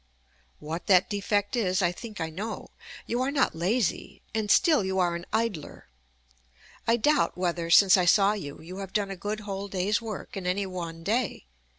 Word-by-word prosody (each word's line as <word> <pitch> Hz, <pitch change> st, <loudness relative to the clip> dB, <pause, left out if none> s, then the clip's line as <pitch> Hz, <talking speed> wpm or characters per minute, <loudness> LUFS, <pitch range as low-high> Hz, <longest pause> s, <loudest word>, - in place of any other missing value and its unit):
What 160 Hz, +3 st, -6 dB
that 185 Hz, 0 st, +4 dB
defect 205 Hz, +2 st, 0 dB
is 190 Hz, -4 st, +1 dB
I 175 Hz, -, +3 dB
think 215 Hz, +4 st, -9 dB
I 160 Hz, -1 st, -3 dB
know. 205 Hz, +7 st, -6 dB, 0.3 s
You 240 Hz, +2 st, -1 dB
are 260 Hz, -, +1 dB
not 280 Hz, -1 st, +1 dB
lazy, 190 Hz, +5 st, -1 dB
and 215 Hz, -1 st, -1 dB
still 315 Hz, -, +4 dB
you 190 Hz, 0 st, -2 dB
are 175 Hz, -2 st, +2 dB
an 170 Hz, +1 st, -6 dB
idler. 220 Hz, -8 st, -3 dB, 1.0 s
I 230 Hz, +1 st, +4 dB
doubt 295 Hz, 0 st, +2 dB
whether, 175 Hz, -2 st, -1 dB
since 190 Hz, +3 st, +7 dB
I 180 Hz, -, +2 dB
saw 195 Hz, +3 st, +5 dB
you, 145 Hz, -10 st, -7 dB
you 180 Hz, +4 st, -9 dB
have 195 Hz, -1 st, -7 dB
done 205 Hz, -2 st, 0 dB
a -, -, -4 dB
good 205 Hz, +4 st, -4 dB
whole 200 Hz, -1 st, -5 dB
day's 200 Hz, +3 st, 0 dB
work 220 Hz, -4 st, -7 dB
in 190 Hz, -2 st, -4 dB
any 195 Hz, +2 st, 0 dB
one 170 Hz, -3 st, -6 dB
day. 220 Hz, -, -1 dB
195 Hz, 190 wpm, -27 LUFS, 180-215 Hz, 1.0 s, since